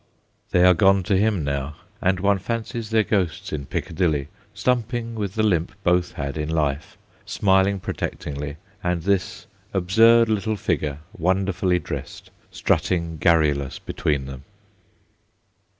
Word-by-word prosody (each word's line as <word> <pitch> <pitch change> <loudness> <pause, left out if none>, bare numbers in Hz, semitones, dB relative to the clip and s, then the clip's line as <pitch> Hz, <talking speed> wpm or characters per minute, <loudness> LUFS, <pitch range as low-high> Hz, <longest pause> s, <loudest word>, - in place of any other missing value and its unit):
They 90 - +3
are 90 - +7
gone 95 +2 +4
to 95 - +1
him 100 -3 +2
now, 70 +1 -3 0.3
and 95 0 +2
one 100 +1 +2
ftncies 115 +2 -4
their 110 -1 +3
ghosts 95 -9 -1
in 70 -3 -4
Piccadilly, 80 -5 -1 0.2
stumping 115 +2 -1
with 105 -4 -4
the 110 - +1
limp 90 -2 +1
both 90 0 +2
had 70 0 -4
in 75 0 -2
life, 75 -3 -1 0.3
smiling 95 0 +2
protectingly, 75 -4 -5 0.3
and 90 -2 -1
this 95 -1 -1 0.3
absurd 115 +5 +5
little 110 0 0
figure, 75 -5 -2
wonderfully 95 0 +1
dressed, - - -7 0.2
strutting 85 -3 0
garru 80 -2 +4
lous 70 -2 -5
between 70 -3 -2
them. 65 0 -9
90 Hz, 135 wpm, -23 LUFS, 75-100 Hz, 0.3 s, are